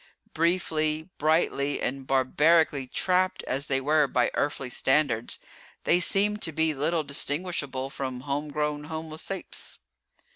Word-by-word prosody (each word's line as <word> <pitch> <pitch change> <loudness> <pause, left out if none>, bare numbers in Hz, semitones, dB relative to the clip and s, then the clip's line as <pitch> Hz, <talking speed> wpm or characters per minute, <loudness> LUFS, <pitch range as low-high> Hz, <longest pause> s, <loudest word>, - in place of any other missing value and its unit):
Briefly, 160 -1 0
brightly 145 -2 +1
and 135 +1 -3
barbarically 140 +2 +3
trapped 185 +6 +1
as 140 +3 -1
they 135 -1 +1
were 150 +2 +3
by 125 -1 +1
earthly 140 -3 -2
standards, 130 -5 +1 0.5
they 175 - +4
seemed 205 +4 +2
to 165 - -1
be 160 0 +1
little 155 +3 0
distinguishable 140 -2 -1
from 130 -3 -4
homegrown 150 +1 -2
homo 160 0 -6
saps. 190 +3 -6
150 Hz, 120 wpm, -27 LUFS, 135-160 Hz, 0.5 s, they